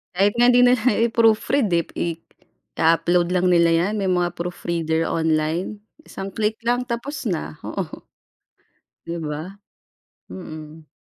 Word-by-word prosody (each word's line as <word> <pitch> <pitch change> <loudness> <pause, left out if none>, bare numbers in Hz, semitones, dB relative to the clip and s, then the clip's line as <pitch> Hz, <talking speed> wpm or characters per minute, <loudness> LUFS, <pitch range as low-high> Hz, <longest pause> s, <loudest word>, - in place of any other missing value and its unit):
Kahit 200 +2 +3
nga 240 +1 +5
hindi 245 0 +6
nila 250 -1 +5 0.3
i-proofread 225 +2 +2
eh, 170 -1 +3 0.9
ia-upload 175 +2 +2
lang 180 0 +2
nila 170 -1 +4 0.2
yan, 210 - -3
may 195 - -1
mga 180 -1 +1
proofreader 170 -2 -2
online. 160 +5 -1 0.3
Isang 195 0 -6
click 215 +1 -1
lang 245 +2 0
tapos 245 +2 -4
na, 155 - -4
oo, - - -5 1.0
di 170 0 -5
ba? 155 +5 -6 0.7
Mm. 155 - -10
180 Hz, 125 wpm, -22 LUFS, 160-220 Hz, 1.0 s, hindi